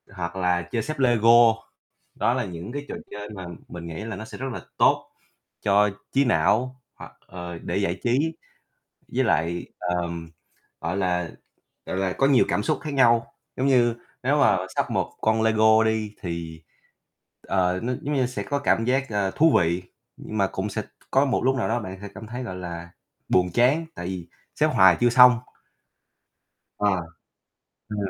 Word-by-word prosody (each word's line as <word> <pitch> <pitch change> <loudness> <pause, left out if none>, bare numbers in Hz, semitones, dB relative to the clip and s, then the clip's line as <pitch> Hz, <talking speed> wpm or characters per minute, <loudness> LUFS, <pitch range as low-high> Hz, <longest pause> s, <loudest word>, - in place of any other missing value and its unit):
Hoặc 85 -1 -4
là 90 -1 +1
chơi 115 - 0
xếp 155 +2 -5
Lego, 120 -2 +6 0.6
đó - - +1
là - - -1
những 90 +5 -7
cái 145 +2 -5
trò - - -4 0.2
chơi 105 0 -7
mà 95 -4 -8 0.2
mình 85 -1 -8
nghĩ 85 +5 -6
là 110 -1 -5
nó 110 - -7
sẽ - - -10
rất 135 - -4
là - - -6 0.2
tốt - - +3 0.5
cho 105 +1 +4 0.2
trí 140 +1 +3
não, 130 +1 +1
hoặc, - - -11 0.2
ờ, 90 -1 -7
để - - -3
giải 95 -2 -1
trí, 125 +2 +2 1.0
với - - +2
lại, 85 +1 0
ờm, 85 -2 -3 0.5
gọi 90 +3 -2
là, 90 -3 0 0.6
gọi - - -3
là, 95 -1 0
có 135 - +2
nhiều 135 -3 +5
cảm 105 - 0
xúc - - 0
khác 150 -2 -4
nhau. 120 -3 +3 0.2
Giống 130 - 0
như 120 -4 +4 0.3
nếu 140 +4 +2
mà 100 -7 +4 0.2
sắp - - 0
một - - -1
con 110 0 +2
Lego 110 0 +4
đi, 110 -1 -1
thì, 85 -3 -5 0.9
ờ, 90 -1 +1
nó 125 +2 -1
giống 145 +1 -2
như 130 -3 +2
sẽ 125 +1 -4
có 145 - -2
cảm 115 -5 +1
giác, 135 +3 +1
ờ, 100 -2 0
thú 160 +8 +4
vị, 85 +1 0 0.3
nhưng 110 - -6
mà 100 - +3
cũng 95 +2 -4
sẽ - - -3
t - - -16 0.2
có 135 +1 +4
một 135 -3 0
lúc 130 +1 +3
nào 130 - -1
đó 120 +2 0
bạn 95 -3 -7
sẽ 100 - -6
cảm 110 - -9
thấy, 120 +4 -6
gọi 95 -7 -6
là, 85 -1 -7 0.4
buồn 90 -1 +3
chán, 135 +7 +3
tại 90 - -6
vì 90 -2 -5 0.3
xếp - - +3
hoài 95 -2 +6
chưa 120 - +5
xong. 125 0 +7 1.4
Ờ. 105 0 +2 1.0
Ờ. 105 - -5
105 Hz, 190 wpm, -24 LUFS, 90-125 Hz, 1.4 s, xong